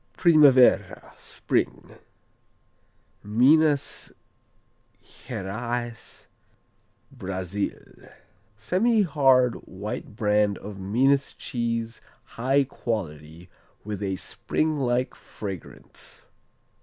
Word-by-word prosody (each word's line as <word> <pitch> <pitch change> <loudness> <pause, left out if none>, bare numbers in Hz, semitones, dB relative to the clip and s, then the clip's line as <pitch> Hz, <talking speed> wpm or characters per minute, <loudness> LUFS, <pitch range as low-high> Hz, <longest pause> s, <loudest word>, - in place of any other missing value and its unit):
Primavera, 145 -7 +4
Spring - - -3 1.2
Minas 140 +7 +2 0.9
Geraes, 120 +3 -6 0.8
Brazil 95 +1 -5 0.5
Semihard 145 - +3
white 105 +2 -7
brand 105 -2 +1
of 100 -1 -9
Minas 130 +8 +1
cheese 115 -1 -3 0.3
high 135 +4 +2
quality, 85 - -5 0.4
with 105 -1 -5
a 95 -2 -1
spring 155 - -2
like 125 0 0
fragrance. 95 -5 -10
115 Hz, 65 wpm, -25 LUFS, 100-135 Hz, 1.2 s, Primavera